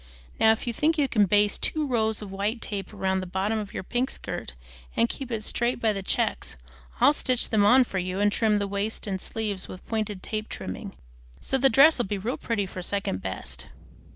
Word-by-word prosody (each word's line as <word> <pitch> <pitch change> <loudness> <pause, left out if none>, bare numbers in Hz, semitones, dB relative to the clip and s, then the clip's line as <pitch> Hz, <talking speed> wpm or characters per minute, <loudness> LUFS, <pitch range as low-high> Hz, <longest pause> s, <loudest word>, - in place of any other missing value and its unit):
Now 220 - +7
if 220 - -1
you 240 - -2
think 315 +7 +2
you 290 -2 +3
can 210 -6 +3
baste 205 +2 +3
two 310 -1 0
rows 220 -5 +1
of 200 - -8
white 205 +4 -1
tape 200 -3 -4
round 190 -2 0
the 185 - -6
bottom 195 +5 -1
of 205 -2 -6
your - - -5
pink 245 +6 -1
skirt 65 - -5 0.4
and 115 - +3
keep 270 - -6
it 225 -3 -3
straight 240 +3 0
by 220 -2 +2
the 195 - -3
checks, 190 - -1 0.4
I'll 285 - +6
stitch 255 -4 0
them 215 -2 +3
on 250 +5 +7
for 195 -5 -3
you 185 +1 -3
and 205 0 +3
trim 215 -1 +2
the 200 -1 -1
waist 200 +2 -2
and 190 -3 -3
sleeves 210 -4 -4
with 185 - -10
pointed 215 -4 -2
tape 215 0 -3
trimming, 205 -4 -6 0.4
so 270 - 0
the 270 +1 +5
dress'll 270 +1 +6
be 205 - -2
real 225 +7 -3
pretty 220 -4 -1
for 185 -1 -7
second 185 - -2
best." 65 -10 -4
210 Hz, 215 wpm, -26 LUFS, 195-235 Hz, 0.4 s, Now